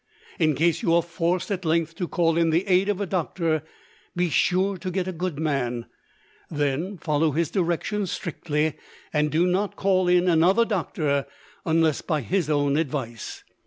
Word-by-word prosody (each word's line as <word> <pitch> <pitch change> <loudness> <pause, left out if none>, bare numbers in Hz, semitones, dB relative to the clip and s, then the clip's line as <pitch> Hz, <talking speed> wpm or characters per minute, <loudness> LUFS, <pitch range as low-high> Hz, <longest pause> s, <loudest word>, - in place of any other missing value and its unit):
In 155 -3 +3
case 165 +3 +2
you 165 - +2
are 170 - +3
forced 170 +3 -1
at 185 -2 -2
length 165 0 +1
to 180 - -2
call 165 -2 +1
in 165 -1 +3
the 165 +4 +2
aid 190 +1 +3
of 205 -2 0
a 200 - -1
doctor, 165 -3 -1 0.5
be 175 -1 0
sure 190 +5 +2
to 185 +2 -4
get 185 0 -2
a - - -1
good 175 -3 -3
man; 130 -6 -1 0.6
then, 150 +6 -1
follow 155 -2 +1
his 165 +1 0
directions 190 +2 -1
strictly, 155 -3 -2 0.4
and 150 0 +2
do 160 +4 +2
not 190 +3 0
call 185 -2 +2
in 180 0 +4
another 180 +7 +4
doctor, 150 -8 -1 0.4
unless 160 -2 +2
by 155 -4 -1
his 175 +3 -1
own 145 -1 +2
advice. 130 -8 -4
165 Hz, 170 wpm, -25 LUFS, 155-185 Hz, 0.6 s, in